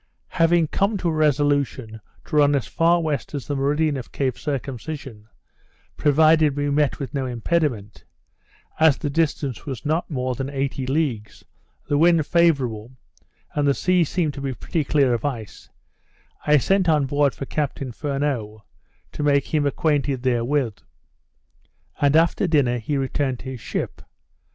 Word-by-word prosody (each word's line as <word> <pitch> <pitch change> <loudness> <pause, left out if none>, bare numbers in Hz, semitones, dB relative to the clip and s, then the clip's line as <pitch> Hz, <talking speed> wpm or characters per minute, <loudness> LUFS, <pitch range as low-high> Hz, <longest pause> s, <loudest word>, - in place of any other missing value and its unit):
Having 165 -1 +2
come 200 +2 0
to 180 -2 -1
a - - -1
resolution 145 -6 0 0.2
to 155 - -5
run 145 -1 +5
as 135 - -1
far 170 +1 +2
west 150 -3 -3
as 140 - -5
the 145 - -3
meridian 145 +2 +1
of 125 - -8
Cape 130 -3 -1
Circumcision, 135 -4 -6 0.7
provided 155 0 +4
we 145 0 0
met 145 0 +1
with 140 - -6
no 135 -2 -2
impediment, 120 -4 -2 0.8
as 160 -3 +5
the 145 - -3
distance 145 -5 -1
was 135 -2 -6
not 160 +4 0
more 130 -4 -2
than 135 +2 -4
eighty 135 -1 -3
leagues, 130 -8 -2 0.4
the 145 0 +1
wind 165 -2 +4
favourable, 130 -10 +1 0.6
and 145 -1 +1
the 140 - +3
sea 180 -1 +2
seemed 160 -1 -1
to 140 - -7
be 135 -2 -3
pretty 160 +5 -2
clear 140 -3 +2
of 115 - -2
ice, 120 -7 -5 0.8
I 150 0 +6
sent 190 +5 +2
on 150 -3 +3
board 145 0 +1
for 135 - -5
Captain 140 -2 -3
Furneaux, 135 -6 -3 0.5
to - - -6
make 140 -1 +1
him 150 -2 +2
acquainted 140 -3 0
therewith, 125 -2 0 1.2
and 145 +1 +3
after 165 +3 +3
dinner 135 -7 +2
he 140 +6 -2
returned 135 -1 -1
to - - -14
his 125 -4 -8
ship. - - -4
145 Hz, 155 wpm, -22 LUFS, 130-155 Hz, 1.2 s, I